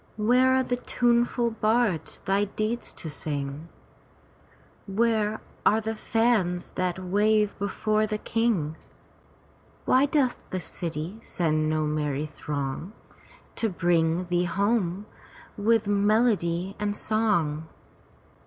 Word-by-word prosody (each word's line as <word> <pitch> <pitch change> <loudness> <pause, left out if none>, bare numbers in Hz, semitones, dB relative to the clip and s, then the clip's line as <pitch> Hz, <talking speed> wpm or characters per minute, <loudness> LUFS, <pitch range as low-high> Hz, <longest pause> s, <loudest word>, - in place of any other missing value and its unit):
Where 250 +4 +4
are 260 - +3
the 245 -1 -1
tuneful 240 -1 +1
bards 220 -5 0
thy 195 +1 +2
deeds 215 +4 -3
to - - -5
sing: 145 0 -4 1.2
Where 220 +1 +1 0.2
are 215 - +4
the 220 0 -3
fans 220 -6 0
that 180 -1 -1
wave 205 +3 +2
before 215 +2 0
the 215 0 -2
king? 210 -10 0 1.1
Why 260 +3 +4
doth 270 -3 +1
the 185 - -2
city 170 +3 -5
send 155 -3 0
no 155 0 +1
merry 150 -1 -1
throng 145 +4 -5 0.6
To 225 - +1
bring 175 -1 +1
thee 175 0 +1
home 200 0 0 0.5
with 220 +1 +2
melody 200 -3 +2
and 205 0 -1
song? 175 -10 0
205 Hz, 110 wpm, -26 LUFS, 170-225 Hz, 1.2 s, Where